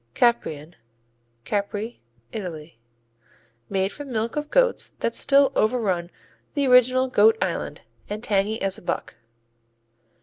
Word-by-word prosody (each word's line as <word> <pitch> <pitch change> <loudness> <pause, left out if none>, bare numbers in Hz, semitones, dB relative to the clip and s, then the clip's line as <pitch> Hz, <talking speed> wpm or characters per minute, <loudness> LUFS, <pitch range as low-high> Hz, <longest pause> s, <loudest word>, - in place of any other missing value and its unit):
Caprian 175 -10 +1 0.7
Capri, 205 +3 -3 0.3
Italy 160 - -7 0.9
Made 195 0 0
from 290 -2 -9
milk 225 0 -2
of 300 0 -3
goats - - +2
that - - -1
still 275 -1 +4
overrun 205 -7 +1 0.5
the 285 -1 +2
original 255 0 +5
Goat 220 -2 +5
Island, 170 -4 -3 0.3
and 210 +2 -5
tangy 210 +1 +1
as 195 -1 -1
a - - -19
buck. 145 - -4
215 Hz, 115 wpm, -24 LUFS, 190-255 Hz, 0.9 s, original